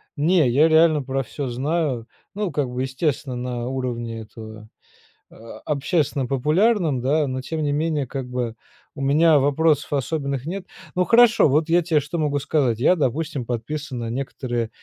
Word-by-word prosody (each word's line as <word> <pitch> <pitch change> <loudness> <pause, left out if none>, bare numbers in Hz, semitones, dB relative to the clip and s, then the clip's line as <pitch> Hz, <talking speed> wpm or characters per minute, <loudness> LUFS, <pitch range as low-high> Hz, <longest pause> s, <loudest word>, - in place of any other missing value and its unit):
не 155 -1 +3
я 145 +6 +4
реально 160 -1 +4
про 135 0 -2
всё 140 +2 -5
знаю, 135 -2 -1 0.3
ну 205 -3 -2
как 145 -4 -1
бы 125 +1 -3
естественно 130 -1 -2
на 125 -1 -4
уровне 120 -3 -4
этого, 110 0 -11 0.6
а, 115 0 -12
общественно 145 -2 0
популярном, 155 - +2
да, 145 +4 +1
но 130 0 -3
тем 155 +4 -4
не 145 - 0
менее 150 -1 0
как 135 0 -5
бы 125 -2 -3 0.4
у 140 - -11
меня 150 +3 +4
вопросов 145 +1 +1
особенных 140 -2 -2
нет. 185 +3 -5 0.3
Ну 180 0 +2
хорошо, 230 -4 +5
вот 150 +4 +1
я 175 +2 +4
тебе 160 -3 +1
что 150 +4 -5
могу 145 -3 0
сказать. 135 -5 0
Я 160 +8 +4
допустим 140 -1 -1
подписан 125 +3 -4
на 115 - -4
некоторые 120 -2 -3
140 Hz, 165 wpm, -22 LUFS, 125-160 Hz, 0.6 s, хорошо